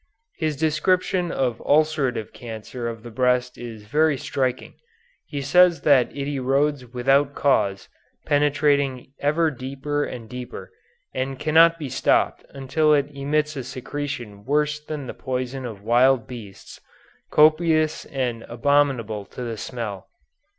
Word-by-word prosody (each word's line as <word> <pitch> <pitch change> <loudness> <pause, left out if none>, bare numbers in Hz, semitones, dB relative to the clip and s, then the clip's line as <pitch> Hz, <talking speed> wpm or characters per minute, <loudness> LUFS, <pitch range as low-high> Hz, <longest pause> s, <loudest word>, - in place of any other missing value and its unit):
His 155 -3 -1
description 175 +3 +1
of 125 -4 -1
ulcerative 145 -7 +1
cancer 115 +1 -7
of 115 -1 -8
the 120 - -9
breast 125 +1 +1
is 115 -3 -9
very 150 +6 +2
striking. 130 -1 -2 0.5
He 140 -2 -4
says 180 +3 +5
that 135 -5 +4
it 140 -1 -5
erodes 135 -1 0
without 135 +3 +2
cause, 100 -8 +1 0.4
penetrating 145 -3 +1
ever 155 +3 +2
deeper 140 +2 -3
and 120 -5 -6
deeper, 125 +1 -8 0.4
and 130 +1 -3
cannot 165 +3 +5
be 150 -4 -5
stopped - - +1
until 150 +3 +2
it 145 0 0
emits 150 +2 0
a 135 - -4
secretion 125 -4 -6
worse 150 +3 +1
than 150 -2 -5
the - - -6
poison 130 0 -4
of 105 -4 -9
wild 120 +1 +4
beasts, 110 -5 -11 0.5
copious 155 0 +3
and 125 -4 -3
abominable 120 -4 +1
to 125 - -8
the 115 -2 -4
smell. 110 -3 -6
135 Hz, 130 wpm, -23 LUFS, 120-150 Hz, 0.5 s, says